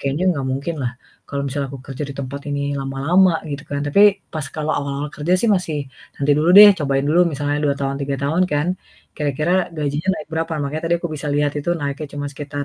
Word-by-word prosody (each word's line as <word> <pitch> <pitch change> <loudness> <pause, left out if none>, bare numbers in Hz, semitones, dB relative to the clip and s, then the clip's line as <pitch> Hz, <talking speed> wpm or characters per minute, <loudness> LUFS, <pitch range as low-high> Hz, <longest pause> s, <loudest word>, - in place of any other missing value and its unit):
kayaknya 140 +6 -1
nggak 135 -3 -3
mungkin 140 +6 -3
lah 125 -1 -2 0.4
kalau 140 0 -3
misalnya 140 0 -3
aku 135 - -7
kerja 135 +1 -6
di 140 - -7
tempat 140 +1 -5
ini 140 0 -2
lama-lama 145 +7 +2 0.2
gitu 140 0 -5
kan. 145 0 -3
Tapi 200 +6 +5
pas 155 -3 -3
kalau 155 0 -2
awal-awal 140 +1 -3
kerja 155 +4 -1
sih - - +1
masih, 180 -6 0 0.4
"Nanti 140 +1 +1
dulu 160 +3 +3
deh, 205 +1 +11
cobain 135 -2 0
dulu 170 +4 +4
misalnya 145 0 -1
2 140 -1 +2
tahun, 135 0 -1
3 140 0 -2
tahun 160 +6 +1
kan, 145 +2 +1 0.5
kira-kira 155 +6 0
gajinya 150 +3 -2
naik 150 - -8
berapa." 165 +1 -2
Makanya 150 +3 -3 0.2
aku 175 - -3
bisa 150 0 -5
lihat 145 0 +1
itu 145 +4 -2
naiknya 145 0 -4
cuma 145 0 -4
sekitar 145 0 -5
145 Hz, 210 wpm, -20 LUFS, 140-160 Hz, 0.5 s, deh